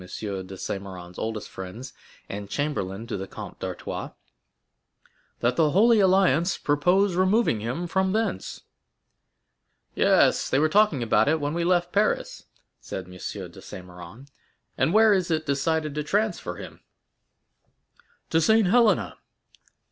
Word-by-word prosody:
de 90 Hz, -, -11 dB, 0.5 s
Saint 95 Hz, +1 st, -4 dB
Méran's 90 Hz, -2 st, -10 dB
oldest 110 Hz, -1 st, -4 dB
friends, 95 Hz, +8 st, -8 dB, 0.3 s
and 100 Hz, 0 st, -7 dB
chamberlain 115 Hz, -9 st, -3 dB
to 115 Hz, -, -4 dB
the 95 Hz, 0 st, -6 dB
Comte -, -, -9 dB
d'Artois, -, -, -5 dB, 1.3 s
"that 125 Hz, +1 st, +1 dB
the 155 Hz, -2 st, +4 dB
Holy 220 Hz, +7 st, +4 dB
Alliance 190 Hz, -2 st, +3 dB
purpose 180 Hz, +7 st, +2 dB
removing 185 Hz, -, +2 dB
him 125 Hz, +11 st, -3 dB
from 190 Hz, +2 st, 0 dB
thence?" 215 Hz, -, -2 dB, 1.3 s
"Yes; -, -, +3 dB
they -, -, +2 dB
were 155 Hz, +2 st, +3 dB
talking 200 Hz, -, +3 dB
about 115 Hz, -, +3 dB
it 160 Hz, +2 st, +2 dB
when 145 Hz, 0 st, -2 dB
we 170 Hz, 0 st, -1 dB
left 175 Hz, 0 st, +1 dB
Paris," 210 Hz, +1 st, 0 dB, 0.3 s
said 95 Hz, -, -6 dB
M. 90 Hz, -, -15 dB
de 90 Hz, -, -11 dB, 0.4 s
Saint 90 Hz, -, -10 dB
Méran; 90 Hz, +8 st, -12 dB, 0.5 s
"and 135 Hz, +5 st, +1 dB
where 220 Hz, +1 st, +6 dB
is 185 Hz, -3 st, 0 dB
it 155 Hz, -1 st, 0 dB
decided 155 Hz, +2 st, 0 dB
to 150 Hz, -, -2 dB
transfer 195 Hz, -, -1 dB
him?" -, -, -10 dB, 1.5 s
"To 165 Hz, -, +3 dB
Saint 220 Hz, +2 st, +4 dB
Helena." 230 Hz, 0 st, +3 dB
155 Hz, 140 wpm, -25 LUFS, -, 1.5 s, where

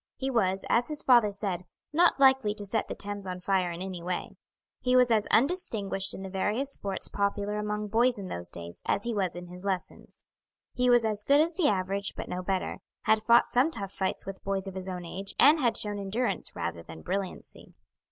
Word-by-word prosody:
He 270 Hz, 0 st, -2 dB
was, 190 Hz, -5 st, +1 dB
as 240 Hz, +1 st, +2 dB
his 305 Hz, 0 st, -3 dB
father 240 Hz, -5 st, +6 dB
said, 195 Hz, -3 st, -3 dB, 0.3 s
not 340 Hz, -1 st, +4 dB
likely 265 Hz, -6 st, +4 dB
to 205 Hz, -, -4 dB
set 215 Hz, +2 st, -1 dB
the -, -, -5 dB
Thames 205 Hz, -1 st, -5 dB
on 180 Hz, 0 st, -4 dB
fire 185 Hz, -1 st, +1 dB
in 170 Hz, +2 st, -5 dB
any 185 Hz, -2 st, -6 dB
way. 180 Hz, +1 st, -3 dB, 0.5 s
He 250 Hz, 0 st, +1 dB
was 250 Hz, -1 st, +5 dB
as 215 Hz, -2 st, +2 dB
undistinguished 220 Hz, -, +1 dB
in 190 Hz, -, -7 dB
the 190 Hz, -, -6 dB
various 215 Hz, +8 st, -1 dB
sports 195 Hz, -1 st, -1 dB
popular 205 Hz, +1 st, -1 dB
among 210 Hz, 0 st, -2 dB
boys 235 Hz, +3 st, +3 dB
in 195 Hz, -2 st, -6 dB
those 85 Hz, -, -2 dB
days 85 Hz, 0 st, -9 dB
as 200 Hz, -, +1 dB
he 235 Hz, -, -1 dB
was 190 Hz, -5 st, -1 dB
in 175 Hz, 0 st, -7 dB
his 180 Hz, +1 st, -11 dB
lessons. 190 Hz, -2 st, -5 dB, 0.5 s
He 250 Hz, 0 st, +2 dB
was 240 Hz, -2 st, +5 dB
as 210 Hz, -1 st, +1 dB
good 280 Hz, +6 st, +4 dB
as 330 Hz, +3 st, +2 dB
the 335 Hz, -2 st, +2 dB
average, 195 Hz, 0 st, -1 dB
but -, -, -5 dB
no 180 Hz, -, -3 dB
better; 185 Hz, 0 st, -2 dB, 0.2 s
had 220 Hz, 0 st, +3 dB
fought 235 Hz, +2 st, +4 dB
some 255 Hz, +6 st, +3 dB
tough 200 Hz, -10 st, -5 dB
fights 190 Hz, -1 st, -2 dB
with 195 Hz, 0 st, -8 dB
boys 195 Hz, 0 st, -2 dB
of 190 Hz, -, -6 dB
his 190 Hz, 0 st, -6 dB
own 180 Hz, -1 st, -5 dB
age, 195 Hz, +3 st, -6 dB
and 295 Hz, +4 st, +7 dB
had 240 Hz, -5 st, +1 dB
shown 205 Hz, -1 st, -2 dB
endurance 210 Hz, +6 st, -2 dB
rather 85 Hz, 0 st, -3 dB
than 80 Hz, -1 st, -11 dB
brilliancy. 195 Hz, -1 st, -5 dB
200 Hz, 215 wpm, -28 LUFS, 190-235 Hz, 0.5 s, and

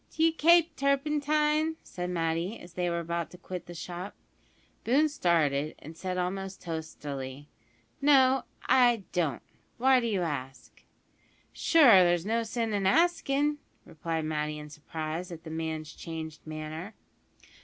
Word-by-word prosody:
"D'you 325 Hz, 0 st, +2 dB
kape 330 Hz, 0 st, +4 dB
turpentine?" 300 Hz, +3 st, +1 dB
said 180 Hz, 0 st, -5 dB
Matty, 170 Hz, +4 st, -1 dB
as 175 Hz, 0 st, -13 dB
they 180 Hz, 0 st, -1 dB
were 170 Hz, 0 st, -1 dB
about 170 Hz, 0 st, -3 dB
to 180 Hz, -, -13 dB
quit 180 Hz, 0 st, -7 dB
the 175 Hz, -, -9 dB
shop. 175 Hz, +3 st, -6 dB, 0.7 s
Boone 280 Hz, +7 st, +3 dB
started, 155 Hz, -, +1 dB
and 160 Hz, +3 st, -11 dB
said 185 Hz, +2 st, -4 dB
almost 190 Hz, +1 st, -3 dB
testily, 145 Hz, -4 st, -6 dB, 0.5 s
"No, 270 Hz, -2 st, +5 dB, 0.2 s
I 240 Hz, -5 st, +4 dB
don't. 160 Hz, -8 st, -1 dB, 0.3 s
Why 260 Hz, +1 st, +5 dB
do 235 Hz, -, -1 dB
you 200 Hz, -5 st, 0 dB
ask?" 130 Hz, -7 st, -6 dB, 0.7 s
"Sure, 250 Hz, -, +6 dB
there's 175 Hz, 0 st, +2 dB
no 230 Hz, +2 st, +1 dB
sin 225 Hz, -1 st, -2 dB
in 200 Hz, -2 st, +1 dB
askin'," 295 Hz, -, +2 dB, 0.3 s
replied 160 Hz, 0 st, -3 dB
Matty 150 Hz, -1 st, -2 dB
in 150 Hz, 0 st, -9 dB
surprise 155 Hz, +3 st, -5 dB
at 165 Hz, -1 st, -9 dB
the 160 Hz, -, -8 dB
man's 160 Hz, -1 st, -4 dB
changed 160 Hz, -2 st, -7 dB
manner. 155 Hz, +6 st, -6 dB
180 Hz, 140 wpm, -29 LUFS, 160-260 Hz, 0.7 s, Sure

